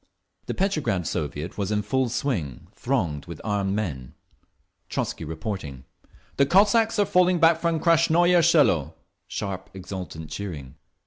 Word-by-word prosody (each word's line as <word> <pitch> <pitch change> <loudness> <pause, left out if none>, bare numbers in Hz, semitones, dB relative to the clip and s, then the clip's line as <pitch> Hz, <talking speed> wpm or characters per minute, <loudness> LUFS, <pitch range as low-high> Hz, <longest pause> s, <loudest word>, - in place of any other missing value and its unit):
The - - -3
Petrograd 150 - 0
Soviet 75 +4 -4
was 100 - -1
in 105 0 0
full 130 +4 0
swing, 85 - -3
thronged 95 - -2
with 85 -3 -8
armed 100 -2 -1
men, 70 -13 -4 0.7
Trotzky - - -3
reporting: 80 - -6 0.5
"The 140 - +4
Cossacks 215 +6 +4
are 205 - +3
falling 180 -2 +3
back 165 0 +5
from 165 -1 0
Krasnoye 170 +1 +4
Selo." 85 - +3 0.3
(Sharp, 95 -2 -5
exultant 90 -5 -7
cheering.) 80 -8 -6
105 Hz, 130 wpm, -25 LUFS, -, 0.7 s, back